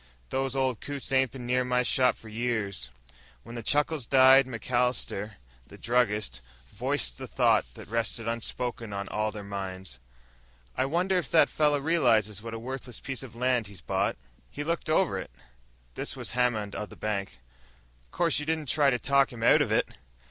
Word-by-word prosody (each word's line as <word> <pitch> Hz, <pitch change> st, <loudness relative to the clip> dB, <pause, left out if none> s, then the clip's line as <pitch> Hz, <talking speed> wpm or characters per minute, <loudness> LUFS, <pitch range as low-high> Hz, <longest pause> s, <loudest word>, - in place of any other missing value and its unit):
"Those 135 Hz, 0 st, -1 dB
old 130 Hz, -3 st, 0 dB
coots 140 Hz, -2 st, -5 dB
ain't 130 Hz, -1 st, +3 dB
been 125 Hz, -1 st, -8 dB
near 125 Hz, +1 st, +2 dB
my 125 Hz, 0 st, +1 dB
shop 125 Hz, +1 st, +2 dB
for 115 Hz, -, -13 dB
years." 110 Hz, -, -2 dB, 0.5 s
When 115 Hz, -, -10 dB
the 120 Hz, -, -5 dB
chuckles 145 Hz, +1 st, +1 dB
died, 130 Hz, 0 st, +7 dB
MacAllister, 120 Hz, -3 st, -1 dB, 0.3 s
the -, -, -13 dB
druggist, 105 Hz, -, 0 dB, 0.3 s
voiced -, -, -1 dB
the -, -, -6 dB
thought -, -, +2 dB
that -, -, -10 dB
rested 115 Hz, 0 st, -2 dB
unspoken 115 Hz, -1 st, -3 dB
on 100 Hz, 0 st, -4 dB
all 110 Hz, 0 st, 0 dB
their 105 Hz, -1 st, -7 dB
minds. 95 Hz, -8 st, -6 dB, 0.8 s
"I -, -, +1 dB
wonder 180 Hz, +6 st, +1 dB
if 175 Hz, -, -6 dB
that 160 Hz, -, +5 dB
fellow 150 Hz, -1 st, +3 dB
realizes 120 Hz, -, +2 dB
what 115 Hz, 0 st, -6 dB
a -, -, -4 dB
worthless 125 Hz, 0 st, -6 dB
piece 135 Hz, -1 st, -4 dB
of 130 Hz, -4 st, -10 dB
land 125 Hz, -2 st, +1 dB
he's 100 Hz, -4 st, -12 dB
bought." -, -, 0 dB, 0.3 s
"He 145 Hz, -, -5 dB
looked 165 Hz, +1 st, -2 dB
it -, -, +2 dB
over." 175 Hz, +1 st, +1 dB, 0.7 s
This -, -, -4 dB
was -, -, -3 dB
Hammond, 115 Hz, -4 st, 0 dB
of 105 Hz, -, -5 dB
the -, -, -12 dB
bank. 100 Hz, -6 st, -3 dB, 0.7 s
"'Course, 165 Hz, -, +1 dB
you 150 Hz, -, -4 dB
didn't 160 Hz, -3 st, -1 dB
try 145 Hz, 0 st, +4 dB
to 125 Hz, -, +2 dB
talk 140 Hz, +2 st, +3 dB
him 115 Hz, -2 st, -7 dB
out -, -, +6 dB
of -, -, 0 dB
it!" -, -, +2 dB
125 Hz, 180 wpm, -28 LUFS, 105-135 Hz, 0.8 s, died